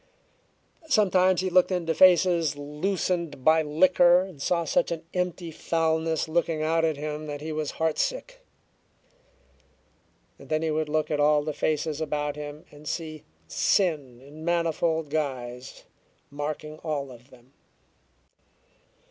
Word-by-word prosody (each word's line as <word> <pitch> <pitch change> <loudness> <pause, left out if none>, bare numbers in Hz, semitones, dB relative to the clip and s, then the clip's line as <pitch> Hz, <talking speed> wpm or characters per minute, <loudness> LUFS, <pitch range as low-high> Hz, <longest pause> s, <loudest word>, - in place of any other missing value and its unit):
Sometimes 185 - +3
he 185 -1 -2
looked 185 +1 +4
into 170 -3 0
faces 175 -3 +4
loosened 155 -1 -2
by 160 +1 +6
liquor 175 +3 +4
and 185 -7 -8
saw 170 +2 0
such 265 +6 +1
an 165 0 -4
empty 180 -2 -2
foulness 160 0 0
looking 160 -1 0
out 165 +1 +1
at 160 -3 +1
him 150 +1 -5
that 145 -1 -5
he 155 +2 -5
was 155 -1 -3
heartsick. - - -2 2.0
Then 155 0 -2
he 160 - 0
would 155 0 -1
look 155 0 0
at 150 - 0
all 150 0 +4
the 155 0 -3
faces 155 +1 -1
about 150 -1 -2
him 150 +1 -8
and 150 +1 -13
see 155 -2 -5 0.2
sin 130 - 0
in 145 +4 -12
manifold 165 -2 0
guise 130 -4 -4 0.5
marking 150 +1 -5
all 145 -4 -3
of 125 +2 -15
them. 130 +1 -20
155 Hz, 130 wpm, -26 LUFS, 150-170 Hz, 2.0 s, by